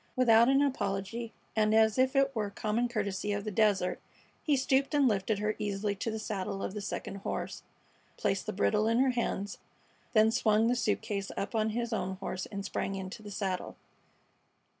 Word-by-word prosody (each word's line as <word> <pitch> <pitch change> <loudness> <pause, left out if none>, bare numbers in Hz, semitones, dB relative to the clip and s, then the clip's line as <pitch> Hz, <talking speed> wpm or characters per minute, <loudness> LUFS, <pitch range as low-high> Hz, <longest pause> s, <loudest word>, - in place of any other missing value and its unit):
Without 235 -1 +6
an 275 +1 +4
apology, 225 -3 -2 0.2
and 215 0 +3
as 220 +1 +4
if 260 +2 +3
it 275 0 +3
were 215 -2 0
the - - -21
common 225 +3 0
courtesy 205 -3 -2
of 205 0 -2
the 215 - -3
desert, 200 -3 +2 0.4
he 295 - +2
stooped 270 +2 +1
and 285 -2 +5
lifted 210 -1 +1
her 210 +1 -1
easily 205 0 -1
to 225 - -2
the 220 - -3
saddle 195 -2 -3
of - - -3
the 210 - -4
second 200 0 -4
horse, 195 - -4 0.6
placed 195 -1 -1
the - - 0
bridle 210 +2 +2
in 230 +1 +2
her 260 +1 +4
hands, 205 -4 -2 0.5
then 220 -1 +5
swung 220 -2 +3
the 245 - +2
suit 235 -3 0
case 200 -2 -3
up 200 - -3
on 220 -1 +1
his 235 +1 -2
own 190 -3 -2
horse 185 -1 -4
and 200 -1 -6
sprang 195 - -2
into 190 +3 -6
the 210 - -9
saddle. 190 -2 -3
215 Hz, 195 wpm, -31 LUFS, 200-235 Hz, 0.6 s, Without